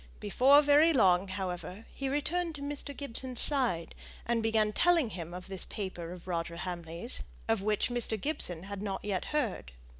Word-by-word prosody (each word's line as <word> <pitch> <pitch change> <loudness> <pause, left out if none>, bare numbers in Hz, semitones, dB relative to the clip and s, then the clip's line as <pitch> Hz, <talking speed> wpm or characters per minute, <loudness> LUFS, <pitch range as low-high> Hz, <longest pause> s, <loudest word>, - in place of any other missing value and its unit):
Before 270 +8 +5
very 295 +3 +6
long, 190 -7 +4
however, 190 +2 -5
he 270 -1 -3
returned 325 +4 -1
to 280 - -7
Mr. 285 -1 -3
Gibson's 260 -2 -3
side, 245 - +2 0.3
and 235 -1 +1
began 220 -1 +2
telling 335 -7 +3
him 170 -3 -6
of 180 +1 -7
this 190 -1 -1
paper 180 -4 -5
of 180 0 -10
Roger 170 -1 -2
Hamley's, 175 +4 -4 0.3
of 225 -3 +1
which 210 +3 +1
Mr. 235 -2 0
Gibson 185 - -1
had 200 0 -6
not 200 -1 -4
yet 195 -3 -1
heard. 230 - -2
215 Hz, 170 wpm, -31 LUFS, 180-280 Hz, 0.3 s, very